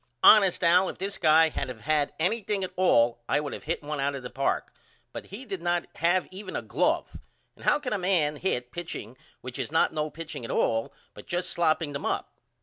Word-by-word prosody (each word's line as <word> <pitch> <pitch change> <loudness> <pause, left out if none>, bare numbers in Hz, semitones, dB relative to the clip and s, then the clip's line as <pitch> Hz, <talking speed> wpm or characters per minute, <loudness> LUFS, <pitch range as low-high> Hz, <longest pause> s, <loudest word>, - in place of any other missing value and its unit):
Honest 195 -4 +7
Al 180 +2 +5
if - - -7
this 195 +2 -4
guy 160 +1 +5
had 135 - -4
of 115 -3 -8
had 150 0 +1
anything 200 +2 0
at 185 - -4
all 120 -10 +3
I - - +3
would 150 -1 -4
of - - -8
hit 160 0 -2
1 150 0 -4
out 140 +1 0
of 135 - -7
the 125 - -7
park, 135 0 -1 0.4
but - - -7
he 215 +8 -9
did 195 -6 -5
not 175 0 0
have 175 +2 +2
even 195 +3 -8
a - - -2
glove. - - 0 0.4
And - - -14
how - - +4
can 280 -6 -4
a 205 - -1
man 170 -5 +1
hit 125 -8 -2
pitching 160 -9 -6 0.3
which 125 0 -7
is - - -3
not 160 - +3
no 155 0 -1
pitching 155 -4 -8
at 115 - -6
all 115 0 0 0.2
but - - -13
just 175 +1 -1
slopping 160 -3 +1
them 140 - -3
up? - - -2
165 Hz, 225 wpm, -27 LUFS, 145-185 Hz, 0.4 s, Honest